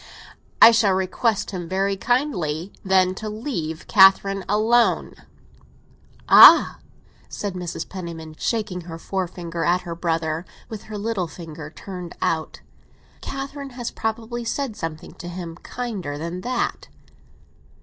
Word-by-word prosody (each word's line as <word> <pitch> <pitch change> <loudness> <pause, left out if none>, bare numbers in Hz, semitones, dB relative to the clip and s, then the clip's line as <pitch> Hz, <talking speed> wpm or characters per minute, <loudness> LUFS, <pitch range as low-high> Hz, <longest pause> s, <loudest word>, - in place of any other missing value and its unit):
"I 230 - +10
shall 220 -4 +3
request 190 +4 0
him 175 -4 -6
very 195 +1 0
kindly, 195 - -1
then, 185 -1 +3
to 215 +3 -6
leave 210 - -4
Catherine 195 -1 +5
alone." 225 +3 +2 1.1
"Ah!" - - +9 0.5
said 205 -2 -4
Mrs. 175 -2 -5
Penniman, 170 -4 -7
shaking 210 -6 -2
her 165 - -6
forefinger 170 -2 -4
at 180 +2 +2
her 175 -2 -6
brother, 165 -1 -2 0.3
with 220 -2 -8
her 215 -1 -7
little 205 -4 -2
finger 160 -2 -9
turned 180 +1 -9
out, 160 -1 -2 0.6
"Catherine 275 +1 -6
had 240 -2 -4
probably 230 +2 -3
said 245 0 -3
something 165 -5 -6
to 175 - -7
him 175 -2 -6
kinder 200 -11 -5
than 170 +4 -5
that." 245 +2 -2
190 Hz, 125 wpm, -23 LUFS, 170-220 Hz, 1.1 s, I